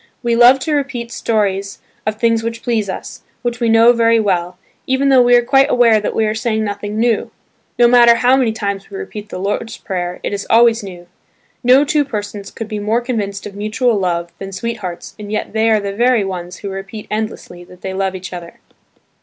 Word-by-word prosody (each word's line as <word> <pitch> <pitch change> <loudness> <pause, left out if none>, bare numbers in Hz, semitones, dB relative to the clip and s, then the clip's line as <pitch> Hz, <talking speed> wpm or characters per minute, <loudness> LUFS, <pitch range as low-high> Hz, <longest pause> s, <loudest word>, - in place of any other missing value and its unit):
We 235 -1 +1
love 245 +3 +7
to 310 - -1
repeat 270 -5 -2
stories 200 -4 -1 0.3
of 215 - 0
things 230 0 +1
which 230 0 -5
please 220 -4 -1
us, 185 - -7 0.2
which 240 0 -2
we 235 -2 +1
know 225 +2 +6
very 230 -1 +3
well, 180 -4 -1 0.3
even 265 +1 +2
though 265 -2 +6
we 245 0 +5
are 240 - +4
quite 270 +2 +4
aware 235 -4 +4
that - - -3
we 220 - +2
are 215 - 0
saying 220 -1 -1
nothing 205 0 -4
new. 230 -2 +1 0.5
No 240 0 +6
matter 235 -1 +6
how 250 +2 +3
many 255 -4 +2
times 200 -2 -4
we 395 - -7
repeat 215 - -8
the - - -6
Lord's 205 +4 -3
Prayer, 180 -2 -4
it - - -3
is 200 0 -4
always 230 0 +5
new. 180 -3 -10 0.6
No 255 +4 +5
two 295 0 +2
persons 205 -6 -6
could 225 - -7
be 215 -1 -4
more 220 +3 0
convinced 210 -5 -3
of 205 - -7
mutual 215 +4 0
love 170 -3 -2
than 195 0 -7
sweethearts 190 -3 -5
and 205 -1 -8
yet 215 - -3
they 220 +1 +2
are 220 -1 +4
the 200 -1 -4
very 235 -1 +2
ones 180 -2 -6
who 200 - -6
repeat 195 +2 -7
endlessly 215 -5 -5
that 180 0 -17
they 190 - -5
love 190 0 -2
each 185 0 -8
other. 175 -1 -9
220 Hz, 210 wpm, -17 LUFS, 195-240 Hz, 0.6 s, love